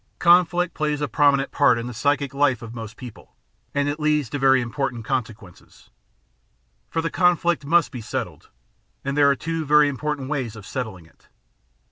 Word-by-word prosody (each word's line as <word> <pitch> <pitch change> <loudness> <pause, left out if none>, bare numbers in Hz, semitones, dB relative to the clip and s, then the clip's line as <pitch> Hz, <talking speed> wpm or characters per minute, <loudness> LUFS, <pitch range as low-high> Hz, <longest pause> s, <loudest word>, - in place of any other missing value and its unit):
Conflict 175 0 +3
plays 150 -2 -1
a 145 - -1
prominent 140 +2 +2
part 140 -4 +3
in 115 - -4
the 125 - -6
psychic 140 +2 0
life 140 -4 +1
of 115 0 -8
most 115 -1 -8
people, 125 -4 -12 0.4
and 145 0 0
it 145 +2 -3
leads 150 -4 0
to 145 - -3
very 135 -1 +4
important 120 -1 -3
consequences. 105 -6 -6 1.0
For 165 - -2
the 165 - -2
con 180 -1 +3
flict 170 -2 -1
must 170 +3 +2
be 125 - -7
settled, 105 - -6 0.6
and 140 0 -2
there 145 -1 +5
are 140 - +3
two 165 +2 -3
very 150 0 +5
important 145 0 -3
ways 130 -6 -3
of 105 -3 -11
settling 110 -10 -6
it. 80 - -26
140 Hz, 180 wpm, -23 LUFS, 120-150 Hz, 1.0 s, there